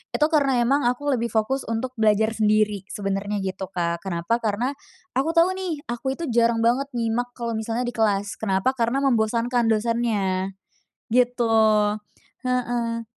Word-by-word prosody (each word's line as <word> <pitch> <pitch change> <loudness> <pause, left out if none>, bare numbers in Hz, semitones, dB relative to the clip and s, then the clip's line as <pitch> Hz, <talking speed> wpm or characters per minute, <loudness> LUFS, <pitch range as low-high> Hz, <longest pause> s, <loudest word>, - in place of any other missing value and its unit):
Itu 300 - +3
karena 275 -5 +3
emang 270 +1 +2
aku 285 +4 0
lebih 235 -3 0
fokus 235 +4 -1
untuk 230 +3 -2
belajar 220 0 +3
sendiri 210 -2 +1
sebenarnya, 200 0 -3
gitu 190 0 -4
Kak. 170 -2 -2
Kenapa? 190 +5 -1
Karena 230 +4 -1 0.4
aku 300 +6 0
tahu 340 +3 +5
nih, 330 -6 -4
aku 265 +3 -2
itu 340 - -6
jarang 230 -1 +2
banget 250 +4 +2
nyimak 240 +1 -1
kalau 235 -1 -3
misalnya 225 +2 -2
di 245 - -2
kelas. 205 -3 0
Kenapa? 195 +3 +1
Karena 260 +2 0
membosankan 235 -1 +1
dosennya, 210 -4 0 0.6
gitu, 245 -2 +2 0.9
heeh. 240 -2 -1
230 Hz, 145 wpm, -24 LUFS, 210-250 Hz, 0.9 s, tahu